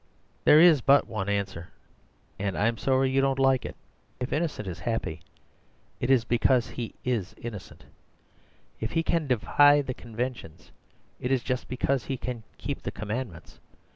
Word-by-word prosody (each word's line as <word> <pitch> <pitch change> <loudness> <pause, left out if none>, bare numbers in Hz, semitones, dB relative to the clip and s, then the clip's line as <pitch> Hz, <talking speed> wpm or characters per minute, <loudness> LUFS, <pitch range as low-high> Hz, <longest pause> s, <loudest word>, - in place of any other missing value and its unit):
"There 150 - +8
is 165 -5 +7
but 140 +4 +5
one 105 -3 -4
answer, 100 -4 -2 0.7
and 100 -1 -2
I 105 - +1
am 115 -1 0
sorry 130 0 +2
if - - -3
you 135 - +3
don't 135 -1 +1
like 135 -2 +3
it. - - -6 0.4
If 125 +1 -3
Innocent 150 - -2
is 90 -2 -5
happy, 85 -7 -3 0.8
it 125 - -2
is 130 -4 +4
because 120 +1 +2
he 120 -2 -6
IS 115 -7 -2
innocent. 110 -5 -9 1.0
If 110 - -3
he 165 0 +1
can 165 -2 0
defy 145 +4 +4
the 130 - -4
conventions, 115 -8 -6 0.5
it 125 - -3
is 130 -3 +1
just 125 0 -2
because 130 0 -1
he 135 - -3
can 125 -2 -5 0.2
keep - - -4
the - - -4
commandments. 105 -3 -6
125 Hz, 170 wpm, -27 LUFS, 105-135 Hz, 1.0 s, There